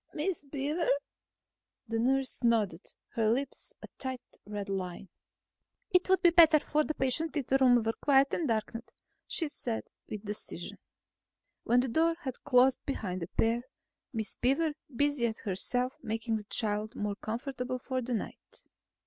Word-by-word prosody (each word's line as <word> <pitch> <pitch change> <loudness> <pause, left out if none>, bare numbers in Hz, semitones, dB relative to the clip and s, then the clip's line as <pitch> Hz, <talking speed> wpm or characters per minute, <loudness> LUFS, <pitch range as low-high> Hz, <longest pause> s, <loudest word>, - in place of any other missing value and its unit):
"Miss 320 0 -1
Beaver...?" 290 - -1 1.0
The 225 0 -1
nurse 265 +2 +1
nodded, 215 -7 +1 0.3
her 220 -2 +2
lips 260 +4 -1
a - - -7
tight 260 -2 -2 0.2
red 205 -1 -4
line. 190 -1 -4 0.8
"It 360 0 +3
would 380 0 +4
be 345 - +7
better 330 -3 +8
for 300 +1 +1
the 310 - -3
patient 300 +5 0
if 280 - -1
the 270 +2 +2
room 245 -3 +5
were 225 0 0
quiet 275 -1 +4
and 325 - 0
darkened," 230 +1 -2 0.4
she 325 - 0
said 240 -5 -3 0.3
with 215 0 -6
decision. 210 +1 -3 0.9
When 245 +1 +4
the 260 - -1
door 330 +6 +3
had 260 -5 -5
closed 260 -1 +4
behind 185 -9 -3
the 165 - -3
pair, 230 +5 +1 0.5
Miss 220 -4 -2
Beaver 295 +5 +1 0.2
busied 255 -5 +2
herself 245 +6 0
making 225 -1 -1
the 210 - -8
child 210 0 -1
more 205 -1 -2
comfortable 250 +4 -4
for 255 +1 -3
the 245 0 -2
night. - - -7
250 Hz, 155 wpm, -31 LUFS, 220-285 Hz, 1.0 s, better